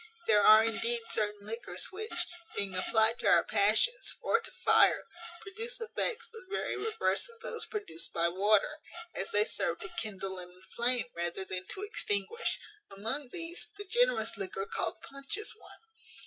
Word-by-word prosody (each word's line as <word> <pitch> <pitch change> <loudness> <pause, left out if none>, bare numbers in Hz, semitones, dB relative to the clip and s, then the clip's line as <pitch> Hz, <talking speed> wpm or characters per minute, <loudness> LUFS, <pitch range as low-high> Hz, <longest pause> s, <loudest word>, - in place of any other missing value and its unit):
There 210 -2 +5
are 215 +2 +9
indeed 230 +1 +1
certain 210 -2 -1
liquors, 225 +3 -4
which, 375 -3 -3 0.3
being 200 -2 -1
applied 220 +5 +3
to - - 0
our - - +6
passions, 220 - +2
or 460 - +3
to 455 - -10
fire, - - +4 0.4
produce 455 +5 -5
effects 455 +1 -1
the 455 -2 -12
very 405 - -1
reverse 445 +3 0
of 460 0 -17
those - - -4
produced 410 - -4
by 170 0 +2
water, 205 - +2 0.3
as 195 - -3
they 210 +1 +3
serve 170 -4 -2
to 195 - -6
kindle 195 -3 -4
and 180 0 -9
inflame, 235 +7 0
rather 175 +2 -2
than 185 0 -5
to 390 - -6
extinguish. 305 - -1 0.3
Among 225 +8 -3
these, 335 +3 -3
the 410 - -6
generous - - +2
liquor 195 0 -2
called - - -3
punch 275 +7 -6
is 430 - -1
one. - - -15
225 Hz, 160 wpm, -32 LUFS, -, 0.4 s, are